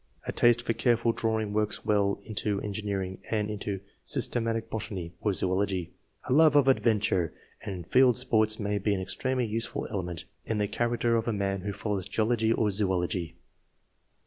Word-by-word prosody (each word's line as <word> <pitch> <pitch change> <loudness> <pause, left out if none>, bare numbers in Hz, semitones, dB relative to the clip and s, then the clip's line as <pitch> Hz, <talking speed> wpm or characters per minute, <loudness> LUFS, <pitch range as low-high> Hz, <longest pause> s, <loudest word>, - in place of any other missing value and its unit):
A - - -2
taste 120 0 +4
for 115 - 0
careful 120 -1 +2
drawing 110 -2 -1
works 105 0 -1
well 100 -1 +2
into 105 -1 -1
en 105 - -4
gineering 95 -3 -3
and 105 -1 0
into 100 -2 -4 0.2
systematic 115 -1 0
botany 95 -7 -5
or 105 - +1
zoology. 95 -1 -1 0.3
A - - -1
love 155 0 +6
of 145 -2 +5
adventure 105 -9 +2 0.3
and 95 -5 -6
field 125 +3 +4
sports 110 -4 +2
may 105 -1 -1
be 100 +1 +1
an - - -2
extremely 125 +7 -1
useful 115 +1 -3
element 90 -4 -4 0.2
in 110 - -2
the 105 -1 +1
character 120 +2 0
of 115 - -2
a - - +2
man 100 -1 -1
who 100 +2 -3
follows 100 -2 -3
geology 110 0 +1
or 110 -2 +2
zoology. 90 -4 0
105 Hz, 170 wpm, -28 LUFS, 100-115 Hz, 0.3 s, love